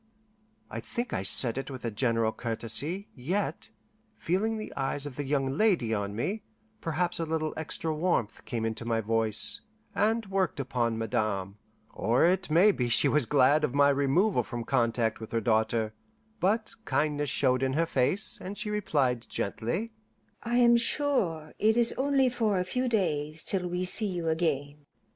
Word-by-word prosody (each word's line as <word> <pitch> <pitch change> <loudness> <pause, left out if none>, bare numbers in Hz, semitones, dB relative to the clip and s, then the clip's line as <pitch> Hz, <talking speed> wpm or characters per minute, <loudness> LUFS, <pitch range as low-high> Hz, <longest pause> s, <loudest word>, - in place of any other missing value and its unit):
I - - -4
think 240 0 -4
I - - -1
said 115 +5 +3
it 135 - -6
with 130 -3 -7
a 115 - -1
general 115 0 +1
courtesy, 120 - -2
yet, 175 +10 -1 0.5
feeling 215 +6 0
the 215 - -6
eyes 135 +1 +1
of 145 -3 -6
the 145 - -3
young 140 0 0
lady 165 - +2
on 100 -1 -2
me, 195 - -2 0.4
perhaps 175 +2 -1
a - - 0
little 155 -1 -2
extra 160 0 -3
warmth 150 - -1
came 115 -2 -3
into 115 +1 -3
my 115 -1 0
voice, 115 - +3 0.3
and 220 +2 +1
worked 190 -5 -1
upon 120 -4 -1
Madame, 105 -3 -2 0.3
or 115 +9 +2
it 180 0 +2
may 175 +7 +6
be 125 -10 -2
she 115 - +4
was 150 -6 +2
glad 145 +2 +4
of 140 -3 -1
my 145 0 +5
removal 140 +9 +2
from 120 -2 -5
contact 115 -3 0
with 110 - -9
her 115 - +1
daughter; 110 0 +1 0.5
but 220 +4 0
kindness 145 -6 0
showed 130 -2 +2
in 130 0 0
her 165 +4 +2
face, 160 +8 0
and 195 +2 -6
she 210 - -2
replied 140 - 0
gently, 170 - -2 0.5
"I 235 +1 -2
am 235 -1 +6
sure 230 - -1
it 220 +2 +3
is 235 -1 +2
only 270 -1 +2
for 225 -5 0
a 180 - +1
few 250 +7 -1
days 155 -7 -1
till 185 -2 -2
we 180 +1 -2
see 210 +4 -2
you 175 -4 -2
again." 145 -3 -2
150 Hz, 170 wpm, -28 LUFS, 120-195 Hz, 0.5 s, may